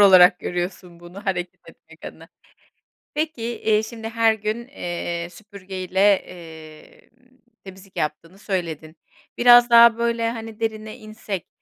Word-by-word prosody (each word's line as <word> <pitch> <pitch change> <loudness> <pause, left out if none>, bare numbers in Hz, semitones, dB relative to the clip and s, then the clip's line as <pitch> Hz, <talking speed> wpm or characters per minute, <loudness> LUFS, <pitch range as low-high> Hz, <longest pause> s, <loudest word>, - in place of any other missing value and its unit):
olarak 185 -2 +7
görüyorsun 175 -1 -5
bunu 180 +4 -12
hareket 180 -2 -3
etmek - - -17
adına. - - -10 0.9
Peki, 305 -5 -3
eee, 220 -2 0
şimdi 225 0 -7
her 230 -1 +3
gün, 220 +3 -4
eee, 175 -7 -5
süpürgeyle, 190 -3 -7 0.2
emm, 165 +8 -14 0.3
temizlik 190 0 -14
yaptığını 165 +4 -4
söyledin. 165 -5 -4 0.4
Biraz 240 0 +7
daha 235 -1 +7
böyle, 235 -1 0
hani, 225 -1 -8
derine 220 0 -4
insek, 215 -5 -7
200 Hz, 120 wpm, -22 LUFS, 180-230 Hz, 0.9 s, olarak